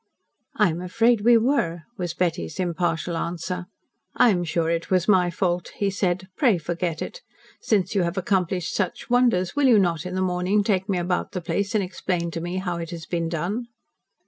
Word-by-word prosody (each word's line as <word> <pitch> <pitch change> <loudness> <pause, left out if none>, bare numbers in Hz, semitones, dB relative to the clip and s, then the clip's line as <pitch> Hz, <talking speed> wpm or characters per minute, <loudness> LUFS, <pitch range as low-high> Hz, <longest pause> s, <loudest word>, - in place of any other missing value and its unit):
"I 210 -5 +3
am 165 +2 -4
afraid 225 +5 +2
we 235 +2 +6
were," 220 - +1
was 175 -5 -4
Betty's 175 -1 -2
impartial 175 -1 -1
answer. 175 +2 -3 0.5
"I 245 - +6
am 175 -3 0
sure 165 0 0
it 165 0 -2
was 185 -1 +2
my 185 -4 +4
fault," 175 0 -1
he 200 -1 0
said. 185 -1 -1
"Pray 235 -9 +3
forget 170 0 -3
it. - - -8 0.4
Since 205 -5 +1
you 200 - +2
have 170 +2 -1
accomplished 185 -2 0
such 195 +3 -2
wonders, 240 -7 +3
will 290 -2 +3
you 235 -4 +6
not, 170 -5 +1
in 180 - -5
the 185 - 0
morning, 185 +3 +1
take 195 -1 0
me 190 - +1
about 180 +1 -1
the 180 - -2
place 200 +5 -2
and 210 - +3
explain 180 -2 -2
to 165 - -4
me 175 +2 -4
how 180 -2 -2
it 165 -1 -5
has 170 -2 -7
been 170 -2 -2
done?" 185 +9 -2
180 Hz, 200 wpm, -24 LUFS, 170-200 Hz, 0.5 s, we